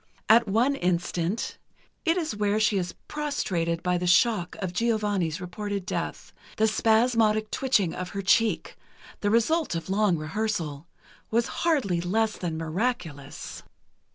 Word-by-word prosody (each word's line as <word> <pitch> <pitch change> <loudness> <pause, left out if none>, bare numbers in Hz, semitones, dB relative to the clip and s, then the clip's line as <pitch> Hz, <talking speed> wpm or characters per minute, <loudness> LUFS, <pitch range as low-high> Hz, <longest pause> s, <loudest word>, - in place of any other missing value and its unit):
At 230 +1 +6
one 230 +8 +2
instant—it 180 - -2
is 315 -11 -2
where 210 0 +1
she 210 -2 +3
is 175 -1 -4
prostrated 180 - -2
by 180 -1 +1
the 180 - -2
shock 180 -1 +3
of 185 -3 -4
Giovanni's 205 -6 0
reported 200 +2 -4
death—the 220 +3 -3
spasmodic 220 -1 +2
twitching 210 -10 +1
of 180 0 -5
her 200 0 -4
cheek—the 215 0 -1
result 235 - +2
of 165 +3 -4
long 200 -3 +3
rehearsal—was 170 +4 -3
hardly 260 - 0
less 215 +5 0
than 165 -3 -3
miraculous. 165 - -3
205 Hz, 120 wpm, -26 LUFS, 175-225 Hz, -, At